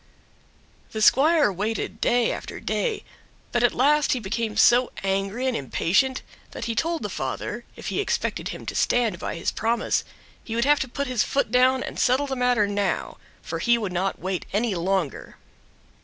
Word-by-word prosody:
The 220 Hz, -, -3 dB
squire 295 Hz, 0 st, +5 dB
waited 210 Hz, +5 st, -3 dB
day 240 Hz, -1 st, +2 dB
after -, -, -6 dB
day, 455 Hz, -4 st, -2 dB, 0.5 s
but 240 Hz, -, +1 dB
at 240 Hz, -, +4 dB
last 295 Hz, +3 st, +3 dB
he 255 Hz, -, -1 dB
became 220 Hz, +1 st, -3 dB
so 240 Hz, +3 st, +5 dB
angry 195 Hz, +5 st, -1 dB
and 260 Hz, -2 st, 0 dB
impatient 190 Hz, -, +1 dB, 0.3 s
that -, -, -5 dB
he 230 Hz, -, -1 dB
told 330 Hz, +8 st, -1 dB
the -, -, -1 dB
father, -, -, -4 dB
if -, -, -6 dB
he -, -, -2 dB
expected 405 Hz, -, -1 dB
him -, -, -7 dB
to -, -, -4 dB
stand 230 Hz, -8 st, +1 dB
by -, -, -4 dB
his 165 Hz, -, -1 dB
promise, 230 Hz, +2 st, 0 dB, 0.4 s
he 225 Hz, -, -5 dB
would 235 Hz, +1 st, +1 dB
have 295 Hz, 0 st, +4 dB
to 265 Hz, -, -2 dB
put 280 Hz, +3 st, -3 dB
his 250 Hz, -4 st, +1 dB
foot 275 Hz, -6 st, -1 dB
down 255 Hz, +1 st, +4 dB
and -, -, -6 dB
settle 260 Hz, +3 st, +3 dB
the 270 Hz, -1 st, -3 dB
matter 250 Hz, -4 st, +2 dB
now, 205 Hz, -1 st, -2 dB, 0.3 s
for -, -, -4 dB
he 235 Hz, -1 st, +3 dB
would 205 Hz, -5 st, -3 dB
not 185 Hz, +2 st, -1 dB
wait 185 Hz, -1 st, -3 dB
any 215 Hz, +2 st, 0 dB
longer. 180 Hz, -3 st, -2 dB
235 Hz, 185 wpm, -24 LUFS, 200-260 Hz, 0.5 s, squire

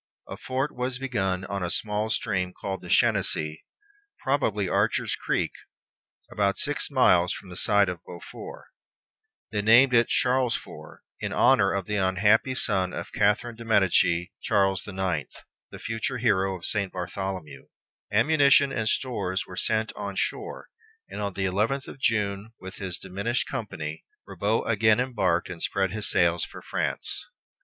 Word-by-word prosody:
A -, -, -6 dB
fort 130 Hz, +3 st, -3 dB
was 125 Hz, +1 st, -2 dB
begun 95 Hz, -8 st, -2 dB
on 100 Hz, -1 st, -4 dB
a 90 Hz, -, -2 dB
small 105 Hz, +3 st, -1 dB
stream 90 Hz, -4 st, -1 dB
called 95 Hz, -1 st, -4 dB
the -, -, -10 dB
Chenonceau, 75 Hz, 0 st, +2 dB, 0.7 s
probably 110 Hz, -8 st, 0 dB
Archer's -, -, +1 dB
Creek, -, -, -1 dB, 0.8 s
about 100 Hz, -1 st, 0 dB
six 145 Hz, 0 st, -1 dB
miles 90 Hz, -10 st, +4 dB
from 95 Hz, -, -10 dB
the 90 Hz, -, -9 dB
site 100 Hz, +2 st, +3 dB
of 90 Hz, -1 st, -5 dB
Beaufort. 415 Hz, -, -10 dB, 0.9 s
They 105 Hz, -2 st, -1 dB
named 120 Hz, +5 st, +6 dB
it 120 Hz, 0 st, +5 dB
Charlesfort, 125 Hz, -1 st, -1 dB, 0.2 s
in -, -, -3 dB
honor 105 Hz, -7 st, +4 dB
of 100 Hz, -2 st, -2 dB
the 105 Hz, +2 st, -2 dB
unhappy 105 Hz, +7 st, +2 dB
son 95 Hz, -7 st, +3 dB
of 85 Hz, -, -6 dB
Catherine 105 Hz, +3 st, +1 dB
de 115 Hz, -, -10 dB
Medicis, 90 Hz, -5 st, +3 dB
Charles 95 Hz, -3 st, +2 dB
the 100 Hz, -, -8 dB
Ninth, 95 Hz, -7 st, -2 dB, 0.3 s
the -, -, -10 dB
future 115 Hz, +3 st, -3 dB
hero 95 Hz, -5 st, +1 dB
of 85 Hz, -, -9 dB
St. 100 Hz, -3 st, +1 dB
Bartholomew. 90 Hz, -5 st, -5 dB, 0.4 s
Ammunition 140 Hz, +4 st, +4 dB
and 110 Hz, -5 st, -1 dB
stores 100 Hz, -9 st, -1 dB
were 90 Hz, -, -10 dB
sent 110 Hz, +3 st, 0 dB
on 100 Hz, -1 st, -5 dB
shore, 415 Hz, -, -3 dB, 0.4 s
and -, -, -6 dB
on 100 Hz, -2 st, -2 dB
the 95 Hz, 0 st, -2 dB
eleventh 105 Hz, +9 st, 0 dB
of -, -, -10 dB
June, 105 Hz, -2 st, 0 dB
with 95 Hz, 0 st, -9 dB
his 95 Hz, -3 st, -3 dB
diminished 100 Hz, +6 st, -2 dB
company, 85 Hz, -, -5 dB, 0.2 s
Ribaut 110 Hz, +3 st, -1 dB
again 110 Hz, 0 st, +3 dB
embarked 95 Hz, -10 st, 0 dB
and 90 Hz, -2 st, -8 dB
spread 95 Hz, -2 st, 0 dB
his 105 Hz, 0 st, -1 dB
sails 85 Hz, -2 st, +3 dB
for -, -, -8 dB
France. -, -, -2 dB
100 Hz, 155 wpm, -26 LUFS, 95-115 Hz, 0.9 s, named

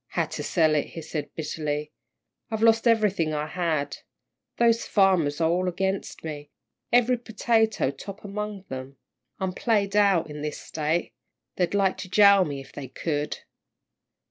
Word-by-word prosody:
"Had -, -, -2 dB
to -, -, -4 dB
sell 160 Hz, -3 st, +2 dB
it," 150 Hz, -, +1 dB
he 165 Hz, -, -8 dB
said, 150 Hz, -2 st, -4 dB
bitterly. 150 Hz, -1 st, -3 dB, 0.6 s
"I've 220 Hz, -1 st, -2 dB
lost 225 Hz, +1 st, +4 dB
everything 205 Hz, -9 st, +2 dB
I 150 Hz, 0 st, -1 dB
had. 155 Hz, -3 st, -2 dB, 0.6 s
Those 230 Hz, -1 st, +3 dB
farmers 180 Hz, -7 st, +3 dB
are 165 Hz, -, +3 dB
all 180 Hz, +1 st, +1 dB
against 190 Hz, +2 st, -2 dB
me. 150 Hz, -2 st, -6 dB, 0.4 s
Every 245 Hz, 0 st, +4 dB
potato 225 Hz, -, +1 dB
top 200 Hz, +9 st, -10 dB
among 205 Hz, -1 st, -5 dB
them. 130 Hz, +1 st, -7 dB, 0.4 s
I'm 190 Hz, -1 st, -2 dB
played 205 Hz, -2 st, 0 dB
out 200 Hz, -6 st, +4 dB
in 150 Hz, -1 st, -7 dB
this 150 Hz, 0 st, -3 dB
State. 155 Hz, -2 st, -2 dB, 0.4 s
They'd 180 Hz, +2 st, 0 dB
like 195 Hz, -2 st, +2 dB
to 185 Hz, -, -7 dB
jail 200 Hz, -1 st, +6 dB
me 145 Hz, -2 st, -4 dB
if 135 Hz, -, -12 dB
they 140 Hz, -2 st, -7 dB
could." 145 Hz, +2 st, -3 dB
180 Hz, 155 wpm, -26 LUFS, 150-205 Hz, 0.6 s, jail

